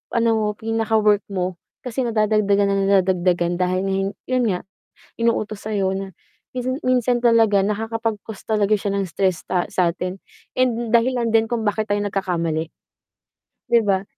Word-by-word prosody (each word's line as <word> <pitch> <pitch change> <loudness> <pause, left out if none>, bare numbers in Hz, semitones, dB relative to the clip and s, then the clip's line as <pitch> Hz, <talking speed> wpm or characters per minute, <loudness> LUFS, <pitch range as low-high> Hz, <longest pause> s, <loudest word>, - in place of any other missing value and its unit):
ano 230 0 +3
mo, 215 -1 0
pinakawork 220 -2 +2
mo, 185 -2 -2 0.3
kasi 250 +1 -2
nadadagdagan 215 -2 +2
na 200 - +1
nang 195 0 +1
nadadagdagan 175 -1 +1
dahil 185 +1 +1
hin 195 0 0 0.2
'yon 255 -1 +2
nga, 180 -2 -1 0.6
inuutos 215 -3 -1
sa 220 - -3
'yo 190 -2 +1
na, 195 0 -5 0.4
minsan 255 +1 -1
minsan 250 -1 +2
talaga 225 -4 +4
nakakapag-cause 220 0 -3
talaga 215 -1 +2
siya 200 -1 -2
ng 195 - 0
stress 185 -1 0
ta 180 -1 0
sa 175 -2 +2
'tin 180 +1 -4 0.4
and 240 -2 +1
dahilan 235 0 +2
din 225 0 +4
kung 240 -2 -1
bakit 215 +1 0
tayo 205 0 +1
nagkakamali. 170 -5 -1 1.0
'Di 235 - +6
ba? 195 -1 +1
205 Hz, 155 wpm, -21 LUFS, 190-225 Hz, 1.0 s, Di